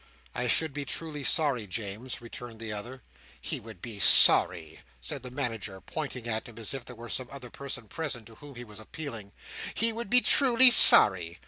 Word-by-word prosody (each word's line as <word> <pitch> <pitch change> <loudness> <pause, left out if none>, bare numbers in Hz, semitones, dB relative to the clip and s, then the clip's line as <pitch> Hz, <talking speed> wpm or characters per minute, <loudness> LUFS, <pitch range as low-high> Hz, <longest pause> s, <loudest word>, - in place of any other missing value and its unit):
"I 125 - -3
should 155 +4 -1
be 145 0 -5
truly 150 0 -6
sorry, 135 -8 0
James," 110 +6 -7
returned 115 -1 -11
the 110 -1 -7
other. 120 +5 -9 0.4
"He - - -5
would 110 -5 -14
be 110 -4 -7
sorry!" 90 -3 +6 0.2
said 65 - -5
the 125 - -8
Manager, 115 -7 -5
pointing 130 -2 -7
at 110 0 -3
him, 115 - -16
as 115 +1 -2
if 135 -3 -8
there 125 - -11
were 120 +1 -11
some 130 +1 -4
other 130 -3 -11
person 135 -4 -8
present 135 -4 -5
to 115 - -16
whom 145 +3 -15
he 120 - -9
was 105 -3 -13
appealing. 115 -4 -9 0.4
"He 230 0 0
would 230 -2 -7
be 250 +3 +5
truly 255 -2 +5
sorry! 90 - +5
120 Hz, 195 wpm, -27 LUFS, 110-140 Hz, 0.4 s, sorry